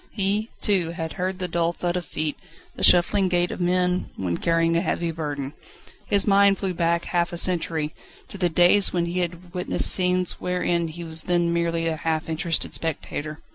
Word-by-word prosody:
He, 205 +2 0
too, 190 -6 +1
had 165 -1 -5
heard 185 0 -3
the 185 -1 -3
dull 170 0 0
thud 175 0 -2
of 180 -2 -3
feet, 155 -1 -2 0.4
the - - -5
shuffling 185 +2 +5
gait 175 0 +1
of - - -6
men 180 0 +1
when 90 -3 -2
carrying 165 0 +1
a 170 - +2
heavy 170 -2 -1
burden. 145 -3 -5 0.5
His 200 -2 +4
mind 200 -1 +4
flew 190 -1 -2
back 170 0 0
half 175 0 0
a 175 - -5
century, 165 -3 +1 0.3
to 200 - -9
the 180 -2 +2
days 175 +4 +5
when 175 -1 0
he 175 +2 -2
had 175 0 -5
witnessed 180 0 +1
scenes 180 -1 +1
wherein 175 -2 0
he 165 +2 -8
was 160 -1 -5
then 175 -1 +1
merely 170 -1 0
a 160 -1 -1
half 160 0 -2
interested 165 +1 -1
spectator. 155 -1 -4
175 Hz, 190 wpm, -24 LUFS, 165-180 Hz, 0.5 s, shuffling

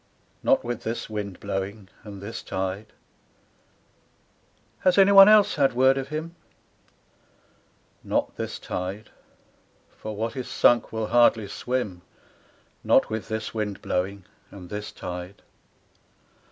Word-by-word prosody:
Not - - +3
with 120 -1 -4
this 115 0 -4
wind 100 -3 -5
blowing, 100 +1 -4 0.2
and 100 -2 -10
this 115 +3 -6
tide, 95 +3 -4 1.9
'Has 185 0 +2
any 195 0 +6
one 195 0 +10
else 215 -1 +6
had 135 -3 +3
word 130 +2 +4
of 135 0 -3
him 155 +3 -5 0.8
?' - - -37
Not - - -1
this - - -5
tide. 95 +4 -5 0.8
For 110 0 -7
what 115 +4 -3
is 130 -2 -5
sunk 120 -1 +3
will 110 -1 -2
hardly 120 -3 +4
swim, 105 -4 -3 0.8
Not - - +3
with 110 -1 -4
this 110 -1 -4
wind 105 -3 -4
blowing, 95 +1 -2 0.2
and 90 -3 -12
this 105 0 -5
tide. 90 +2 -8
110 Hz, 125 wpm, -25 LUFS, 100-125 Hz, 1.9 s, one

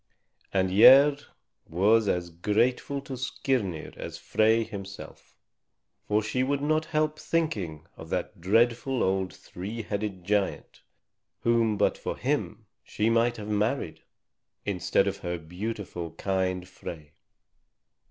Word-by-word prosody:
And 95 -1 +1
Gerd 140 +6 +8 0.4
was 105 +6 +3
as 90 -2 -1
grateful 115 +10 0
to 135 - -8
Skirnir 125 - -2
as - - -6
Frey 110 +1 +2
himself. 100 -3 -9 0.7
For 105 +1 +2
she 125 +4 0
could 140 +1 0
not 155 +1 +1
help 155 0 0
thinking 100 - -2
of 80 - -11
that 90 -1 -3
dreadful 120 +6 +2
old 95 -1 0
three 105 +8 -7
headed 100 -3 -4
giant 100 +1 -1 0.6
whom 115 -2 +2
but 100 - +1
for - - -4
him - - -2 0.2
she 110 +2 0
might 115 +1 +2
have 105 -1 -7
married, 105 - -1 0.6
instead 95 -4 +1
of - - -2
her 90 0 -4
beautiful, 90 0 -5
kind 95 0 -1
Frey. 80 -4 -9
105 Hz, 125 wpm, -27 LUFS, 90-120 Hz, 0.7 s, Gerd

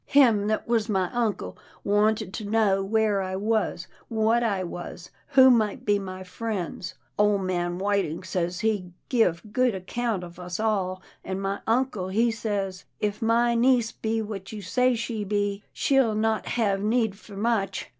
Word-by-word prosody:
" - - -47 0.2
Him 215 -6 +4
that 215 0 -1
was 230 -2 +1
my 190 -3 +1
uncle 235 -4 -1 0.3
wanted 205 -1 +1
to 220 - -4
know 205 -3 +3
where 210 0 +2
I 185 0 -3
was, 210 -3 0 0.2
what 225 +1 +2
I 200 -5 0
was, 175 0 -7 0.2
who 260 -1 +8
might 220 -4 +1
be 205 -1 +3
my 185 -1 -6
friends. 185 -3 -4 0.2
Ole 210 -1 +4
man 175 -2 -1
Whiting 195 -4 0
says 180 0 -2
he 205 -5 -1 0.2
give 180 -9 +2
good 250 -3 +2
account 205 +1 -2
of 175 0 -10
us 180 +1 -5
all, 190 -4 0 0.2
an' 190 0 -3
my 195 0 -2
uncle 225 -5 +1
he 225 +5 +2
says, 200 -4 -3
* - - -47
If 205 - -12
my 235 +1 +3
niece 235 -1 +3
be 225 0 -2
what 200 -3 -7
you 210 -2 -7
say 250 +7 +2
she 225 -2 -3
be, 205 0 -1
she'll 265 -6 +2
not 220 0 0
hev 200 -5 +1
need 220 -1 +1
for 200 0 -12
much. 205 -3 0
210 Hz, 175 wpm, -26 LUFS, 190-225 Hz, 0.3 s, who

